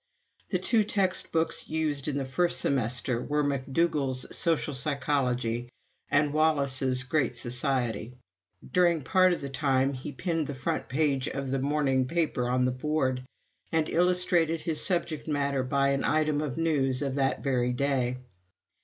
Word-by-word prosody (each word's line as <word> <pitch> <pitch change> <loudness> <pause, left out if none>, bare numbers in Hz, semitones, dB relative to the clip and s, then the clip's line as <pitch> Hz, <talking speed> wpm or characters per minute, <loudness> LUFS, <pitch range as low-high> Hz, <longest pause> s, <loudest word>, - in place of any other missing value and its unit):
The - - +1
two 225 -3 +2
textbooks 185 -5 +1
used 155 -3 -1
in 145 -2 -1
the 135 - -2
first 175 +6 +1
semester 125 -1 0
were 150 0 0
McDougall's 140 -1 0
"Social 160 -3 +1
Psychology" 125 -4 -1 0.4
and 145 0 +2
Wallas's 140 -4 +1
"Great 145 +3 0
Society." 125 -2 -1 0.5
During 175 -4 +2
part 185 +5 +4
of 175 - -2
the 140 - -5
time 135 -1 +1
he 135 +3 -6
pinned 160 +3 -2
the 145 - -5
front 130 - -3
page 135 -1 +1
of 135 -1 -4
the 135 - 0
morning 135 -2 +1
paper 150 -6 0
on 125 0 +2
the 125 - +1
board, 130 -1 -1 0.5
and 160 -1 +1
illustrated 175 -2 +2
his 160 -2 -1
subject 170 -5 -1
matter 140 -2 0
by 140 +2 +1
an 140 0 0
item 155 -1 +1
of 150 -3 -4
news 145 -5 +1
of 135 -2 -2
that 135 -1 0
very 125 -3 +1
day. 125 -1 0
140 Hz, 150 wpm, -28 LUFS, 130-155 Hz, 0.5 s, part